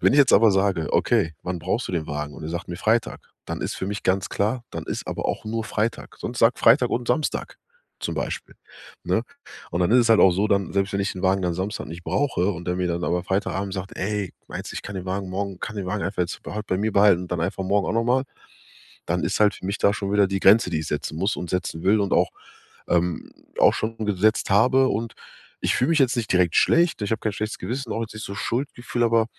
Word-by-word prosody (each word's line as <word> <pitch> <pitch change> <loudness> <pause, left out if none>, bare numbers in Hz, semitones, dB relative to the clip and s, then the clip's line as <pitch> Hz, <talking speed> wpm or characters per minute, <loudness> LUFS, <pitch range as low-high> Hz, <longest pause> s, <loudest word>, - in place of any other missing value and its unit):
Wenn - - +4
ich - - +4
jetzt 135 - +4
aber 110 0 +6
sage: 95 -4 +1
„Okay, 80 -1 +2
wann 90 0 -3
brauchst 95 +8 -1
du - - -4
den 80 -3 -1
Wagen?“ 75 -1 -4
Und - - -10
er - - -4
sagt 85 +3 -5
mir 85 - -5
„Freitag“, 115 +5 0 0.3
dann - - -4
ist - - -3
für 95 - -4
mich 100 +1 -4
ganz 95 0 +1
klar, 115 +5 -1
dann - - -6
ist - - -4
aber - - -3
auch - - -3
nur 110 +1 -3
Freitag. 110 +1 -3
Sonst 120 0 -5
sag 115 +2 +4
"Freitag 125 +1 +5
und 120 0 -1
Samstag" 155 -2 -1 0.4
zum - - -3
Beispiel, - - -4 0.5
ne? - - +1 0.5
Und 85 - -2
dann 90 - +2
ist 125 - +7
es 115 - +2
halt 110 - +6
auch 95 - +7
so, 100 +4 +1
dann 100 -3 +1
selbst 95 0 +1
wenn 100 - 0
ich 100 - -1
den 90 - -8
Wagen 95 0 +2
dann 90 -2 0
Samstag 95 +5 -3
nicht 85 +2 -9
brauche 130 -9 +1
und 85 -1 -8
der 90 - 0
mir 90 0 0
dann 85 0 -2
aber 90 0 -1
Freitagabend 95 +1 -1
sagt: 95 0 -6
„Ey, 100 -1 -2 0.2
meinst, - - -6
ich - - -5
kann 100 - -7
den 95 0 -6
Wagen 95 0 -3
morgen 100 0 -3
kann 105 - -5
den 100 -2 -3
Wagen 100 +2 -2
einfach 95 - -4
jetzt 85 - -5
bei - - -7
heut 105 -1 -4
bei 95 - 0
mir 110 +2 0
behalten 100 -3 +5
und 90 - -6
dann 90 - -1
einfach 95 +3 -2
morgen 100 +1 +1
auch - - -1
noch 115 0 +1
mal“, 130 +3 +2 0.8
dann 90 +1 -1
ist 95 - -1
halt 105 -1 +4
für - - -9
mich 100 +3 -2
da 100 - +4
schon 100 -1 -3
wieder 100 -1 +4
die 95 +1 -2
Grenze, 105 0 +6
die 80 -3 -1
ich 80 - -5
setzen 75 +1 -3
muss 95 +5 0
und 90 - -6
setzen 90 -2 -3
will 105 +3 +4
und 100 - 0
auch, - - +3 0.6
ähm, 85 -1 0 0.3
auch - - +6
schon 115 +1 -3
gesetzt 105 +2 +1
habe. 130 +6 +5
Und 115 +1 -2 0.5
ich - - +1
fühl 125 - +2
mich 165 - +3
jetzt 135 -1 +3
nicht 115 -2 -1
direkt 90 -2 +3
schlecht. 170 -6 +3
Ich 105 - -2
hab 110 - 0
kein 110 - 0
schlechtes 110 +1 -3
Gewissen, 120 +6 -4
auch 115 - -2
jetzt 115 - -5
nicht 110 +1 -7
so 100 - -6
Schuldgefühl, 120 +1 -3
aber 115 -1 +3
100 Hz, 260 wpm, -24 LUFS, 90-110 Hz, 0.8 s, ist